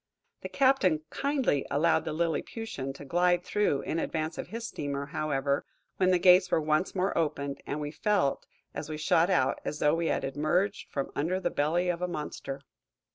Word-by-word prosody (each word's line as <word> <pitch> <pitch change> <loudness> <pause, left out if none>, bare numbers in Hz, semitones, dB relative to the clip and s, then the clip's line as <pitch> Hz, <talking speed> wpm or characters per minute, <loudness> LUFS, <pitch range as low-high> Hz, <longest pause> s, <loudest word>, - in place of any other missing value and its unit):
The - - -6
captain 260 - +3
kindly 270 - 0
allowed 165 +3 +2
the - - -2
liliputian 165 - -2
to 145 - -10
glide 175 +4 +2
through 205 -8 +1
in 165 - -2
advance 160 0 -2
of - - -4
his 230 +5 -6
steamer, 140 -1 -4
however, 140 -1 -1 0.3
when 185 -1 +3
the 185 - +5
gates 180 +1 +6
were - - +3
once 155 +5 0
more 190 +1 0
opened, 140 -3 -1
and 145 - -2
we 145 0 -4
felt, 160 -4 0 0.3
as 145 +1 -6
we 155 - -4
shot 160 +3 +3
out, 135 -7 +2
as 150 - -3
though 150 - +3
we 165 0 0
had - - 0
emerged 155 +9 0
from 140 -1 -3
under 175 +6 0
the - - -1
belly 165 +5 +1
of 175 0 -1
a 180 - 0
monster. 150 -4 -5
160 Hz, 185 wpm, -29 LUFS, 145-180 Hz, 0.3 s, gates